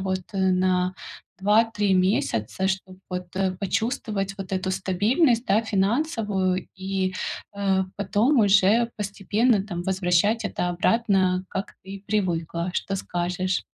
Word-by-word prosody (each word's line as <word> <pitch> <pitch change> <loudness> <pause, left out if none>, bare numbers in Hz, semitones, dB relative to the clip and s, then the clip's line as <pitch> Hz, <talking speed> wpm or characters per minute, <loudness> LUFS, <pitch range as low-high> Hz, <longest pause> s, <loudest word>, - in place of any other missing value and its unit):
вот, 190 -1 -1
э, - - -2
на 185 0 +1 0.5
2-3 210 -1 +3
месяца, 185 - +1
чтоб 190 -1 -4
вот, 180 -1 -5
э, 190 -1 +1
почувствовать 205 -2 -2
вот 195 -1 -7
эту 185 0 -1
стабильность, 220 - +1
да, 215 +3 +3
финансовую 205 - 0
и, 190 0 -2 0.4
э, 195 -1 +1
потом 215 +7 +2
уже 205 +3 +4
постепенно 205 +2 +1
там 175 -4 -5
возвращать 190 +4 +1
это 180 - -2
обратно, 190 -1 +2
как 195 +1 -5
ты 190 - -12
и 195 0 -9
привыкла. 175 -4 -1
Что 195 - -2
скажешь? 180 0 -2
195 Hz, 125 wpm, -24 LUFS, 185-210 Hz, 0.5 s, уже